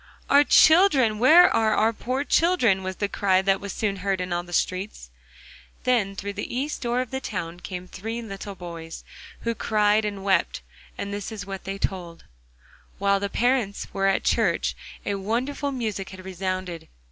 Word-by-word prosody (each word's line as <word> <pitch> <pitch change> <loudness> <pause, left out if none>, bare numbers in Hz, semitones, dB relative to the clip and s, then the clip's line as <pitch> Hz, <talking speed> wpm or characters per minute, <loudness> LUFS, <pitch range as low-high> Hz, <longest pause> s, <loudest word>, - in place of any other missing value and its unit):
'Our 285 +1 +7
children! 290 - +5
where 315 +9 +8
are 220 -1 +3
our 225 +1 +3
poor 255 +5 -2
children?' 290 - +3
was 190 0 -4
the 205 - -1
cry 190 -2 +2
that 195 0 +2
was 200 -1 -5
soon 200 -1 -2
heard 195 0 -1
in 180 -1 -3
all 175 - 0
the 175 0 -13
streets. 185 - -2 0.7
Then 230 -6 +1
through 200 +1 -5
the 205 +4 -5
east 280 +4 -2
door 240 0 0
of 255 - -6
the 265 0 -3
town 175 -7 -5
came 180 0 -7
three 225 +6 -5
little 195 -2 -7
boys, 170 -2 -8 0.4
who 230 - -1
cried 215 -1 +2
and 205 -2 -4
wept, 190 - +1 0.3
and 200 0 -4
this 205 +2 -5
is 205 -4 -6
what 195 -1 -7
they 195 +1 -4
told: 175 -4 -4 0.7
While 200 0 +2
the 200 0 -2
parents 240 -3 0
were 195 0 +1
at 195 - +1
church - - +1 0.3
a 205 - -1
wonderful 245 +9 -2
music 220 -7 -3
had 185 -1 -11
resounded. 185 -2 -4
200 Hz, 180 wpm, -25 LUFS, 190-230 Hz, 0.7 s, where